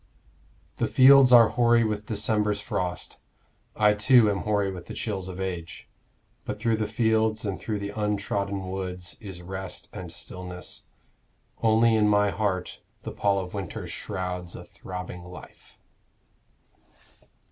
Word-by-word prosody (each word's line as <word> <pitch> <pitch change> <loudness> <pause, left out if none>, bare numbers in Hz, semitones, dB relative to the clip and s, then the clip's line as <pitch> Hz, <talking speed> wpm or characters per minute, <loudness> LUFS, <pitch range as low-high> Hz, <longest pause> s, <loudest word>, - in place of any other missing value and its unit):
The - - 0
fields 135 0 +7
are 120 -2 +8
hoary 120 -1 +3
with 105 -1 -2
December's 105 -1 0
frost, 90 -3 -3 0.6
I 105 -1 +4
too 110 +1 +5
am 100 - -2
hoary 100 -1 0
with 90 -2 -9
the - - -7
chills 95 -4 -3
of 95 0 -7
age. 90 -3 -5 0.6
But - - -5
through 115 -1 +1
the 110 -1 -1
fields 110 0 +1
and 100 -2 -3
through 110 -2 -3
the 100 0 -5
untrodden 100 -2 -2
woods 90 -2 -3
Is 95 -5 -7
rest 95 +1 -6
and - - -7
stillness 90 -1 -8 0.8
only 115 +1 +4
in 105 -1 +3
my 105 -1 +3
heart 100 -4 -2 0.2
The - - -5
pall 100 -1 +1
of 90 -1 -8
winter 100 -4 -5
shrouds 90 -1 -5
a - - -8
throbbing 90 -1 -8
life. 90 0 -13
100 Hz, 140 wpm, -26 LUFS, 95-110 Hz, 0.8 s, are